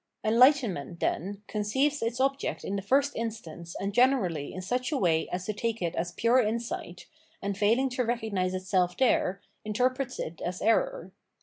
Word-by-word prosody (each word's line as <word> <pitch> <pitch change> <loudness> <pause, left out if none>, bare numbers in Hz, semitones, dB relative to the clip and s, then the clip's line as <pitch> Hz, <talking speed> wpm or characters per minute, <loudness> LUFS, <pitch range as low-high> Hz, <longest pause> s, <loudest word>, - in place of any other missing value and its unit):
Enlightenment, 225 - +3
then, 200 +6 -2
conceives 265 +9 0
its 230 +2 -2
object 270 +1 0
in 195 - -2
the 200 - -2
first 275 +8 +2
instance 175 -7 -6
and 200 +1 -2
generally 205 - +2
in 185 - -6
such 250 +9 -2
a 295 - +1
way 165 -7 +1
as 180 0 -3
to 215 - -2
take 230 +2 -2
it 170 -2 -2
as 175 +1 -2
pure 235 +3 +3
insight, 230 +1 -3 0.3
and 200 0 -3
failing 225 +6 +3
to 250 0 -1
recognise 220 -6 -1
itself 185 -1 0
there, 200 -7 +2 0.2
interprets 255 +4 -1
it 160 +1 -5
as 180 +1 -3
error. - - +1
215 Hz, 170 wpm, -28 LUFS, 185-255 Hz, 0.3 s, Enlightenment